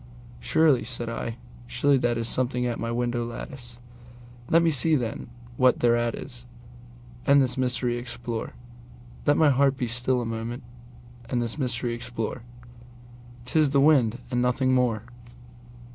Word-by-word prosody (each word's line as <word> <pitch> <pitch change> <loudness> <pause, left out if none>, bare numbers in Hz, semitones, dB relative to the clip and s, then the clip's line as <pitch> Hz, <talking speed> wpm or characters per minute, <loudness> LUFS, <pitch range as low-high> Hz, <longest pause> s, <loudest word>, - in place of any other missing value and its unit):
"Surely," 135 - +3
said 120 0 -2
I, 115 0 -4 0.3
"surely 140 +4 +2
that 120 -2 0
is 115 0 -2
something 125 0 0
at 120 -1 -2
my 115 - -3
window 120 0 -1
lattice; 120 +1 -8 0.7
Let 165 +1 +5
me 165 - +3
see, 155 +2 +4
then, 120 -3 -3 0.3
what 125 -1 +3
thereat 120 -1 +2
is, 125 -2 -8 0.8
and 140 0 +6
this 130 -2 +2
mystery 125 -1 0
explore; 120 -1 -5 0.7
Let 145 - +4
my 155 -3 +5
heart 135 0 +3
be 125 - -1
still 125 +2 0
a 120 - -3
moment 115 +2 -5 0.7
and 125 - 0
this 120 +5 -3
mystery 120 -2 -1
explore:'T 120 +1 -9
is 155 -2 +4
the 140 0 +2
wind 135 -6 +4
and 125 -1 +1
nothing 130 +1 +1
more." 120 -4 +1
120 Hz, 145 wpm, -26 LUFS, 120-130 Hz, 0.8 s, and